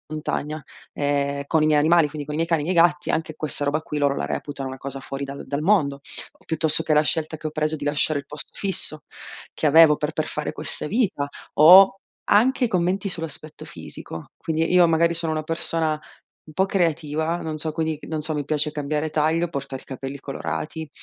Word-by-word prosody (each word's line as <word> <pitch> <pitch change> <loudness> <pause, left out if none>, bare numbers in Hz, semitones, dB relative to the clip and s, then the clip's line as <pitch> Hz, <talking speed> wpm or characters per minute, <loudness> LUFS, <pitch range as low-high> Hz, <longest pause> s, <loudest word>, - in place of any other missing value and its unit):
Montagna, 155 0 -3 0.3
ehm, 140 -1 0
con 160 0 +2
i - - +4
miei 155 -1 +4
animali, 160 +1 +4
quindi 145 -1 -6
con 150 - -5
i - - -2
miei 165 +1 0
cani 165 -3 +2
e 150 - -3
i - - +2
miei 170 -1 +6
gatti, 150 -3 -2
anche 160 -1 -2
questa 150 -2 -3
roba 145 +2 0
qui 150 - -5
loro 140 -1 +2
la - - -2
reputano 135 - -4
una 130 0 -6
cosa 135 +1 -6
fuori 135 +1 -6
dal 140 0 -7
dal 140 +2 -3
mondo. 150 -7 +2 0.4
Piuttosto 160 0 0
che 155 - +1
la 150 - +5
scelta 155 +1 -1
che 155 - -5
ho - - -5
preso 155 0 -1
di 145 - -6
lasciare 145 0 0
il 140 - -10
posto 150 +1 -8
fisso 165 -6 -4 0.5
che 155 - 0
avevo 155 +1 +7
per 150 +1 -2
per 155 0 -2
fare 150 - -3
questa - - -5
vita 195 - 0 0.3
o 185 +6 +8 0.3
anche 245 +4 +3
commenti 185 0 0
sull'aspetto 160 -3 -7
fisico. 80 -1 -9
Quindi 160 -1 -1
io 180 -1 +6
magari 165 +1 +3
sono 165 -1 -1
una 155 0 -2
persona 160 -1 -1 0.4
un 155 - -15
po' 190 +4 +2
creativa, 165 -3 0
non 160 -2 -4
so 155 +1 -3
quindi 160 -1 -2
non 155 -1 -3
so, 155 +1 -3
mi 150 -1 -2
piace 150 +1 0
cambiare 150 +1 -2
taglio, 160 +3 +1
portare 135 -4 -6
i - - -28
capelli 135 +1 -6
colorati, 150 +3 -5
155 Hz, 210 wpm, -23 LUFS, 145-165 Hz, 0.5 s, o